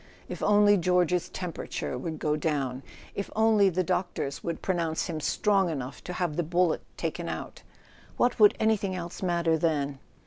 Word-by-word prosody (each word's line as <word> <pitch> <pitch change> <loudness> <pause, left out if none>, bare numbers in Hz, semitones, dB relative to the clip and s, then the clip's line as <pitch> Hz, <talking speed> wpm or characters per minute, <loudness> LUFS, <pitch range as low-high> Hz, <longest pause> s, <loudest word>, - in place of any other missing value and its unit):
If - - -7
only 205 0 +5
George's 180 -1 +2
temperature 175 -7 -4
would 155 +5 -4
go 150 0 0
down 140 -4 -1 0.3
—if 200 - -4
only 215 -2 +4
the 185 +1 0
doctors 175 -6 -2
would 170 -1 -4
pronounce 170 -4 0
him 160 -2 -4
strong 195 +3 +2
enough 135 -4 -5
to 180 - -4
have 175 -4 -2
the - - +3
bullet 175 +1 +1 0.2
taken - - -3
out! - - -6 0.6
What 245 0 +2
would 210 -1 +7
any¬ 220 -1 +3
thing 195 -3 -2
else 175 -1 -6
matter 170 -3 +1
then? 145 -4 0
175 Hz, 170 wpm, -28 LUFS, 155-195 Hz, 0.6 s, would